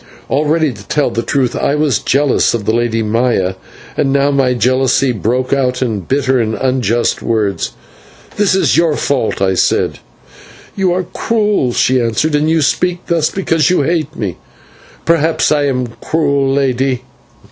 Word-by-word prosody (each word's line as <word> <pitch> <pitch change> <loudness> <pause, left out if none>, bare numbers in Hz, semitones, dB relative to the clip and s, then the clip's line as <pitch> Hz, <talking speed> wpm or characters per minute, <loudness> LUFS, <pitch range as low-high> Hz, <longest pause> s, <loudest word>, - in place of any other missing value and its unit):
Already, 150 0 +1
to 100 -2 -14
tell 150 -1 0
the 115 - -1
truth, 130 -1 -1
I 140 - 0
was 150 -8 +1
jealous 140 -2 +1
of 110 -3 -4
the 110 - +1
Lady 115 -1 0
Maya, 110 -4 0 0.4
and 135 -2 0
now 140 +1 +2
my 135 -3 +1
jealousy 130 +1 +2
broke 125 +4 -1
out 130 -2 0
in 110 -5 -2
bitter 130 +6 0
and 110 -1 -1
unjust 120 -3 0
words. 110 -4 -1 0.6
"This 205 -2 +2
is 190 - +2
your 165 -2 +2
fault," 125 -7 -1
I 95 0 +2
said. - - 0 0.8
"You 190 -2 +1
are 185 +1 0
cruel," 210 - 0
she 130 +1 +2
answered, 115 +7 0
"and 150 +1 +2
you 160 -1 +2
speak 180 +5 0
thus 165 -3 +1
because 165 -4 0
you 180 -5 +2
hate 155 0 -1
me." 100 - -4 0.7
"Perhaps 165 -1 +2
I 145 -1 +2
am 125 -2 0 0.2
cruel, 140 -4 0
lady. 130 -2 0
135 Hz, 160 wpm, -15 LUFS, 120-155 Hz, 0.8 s, now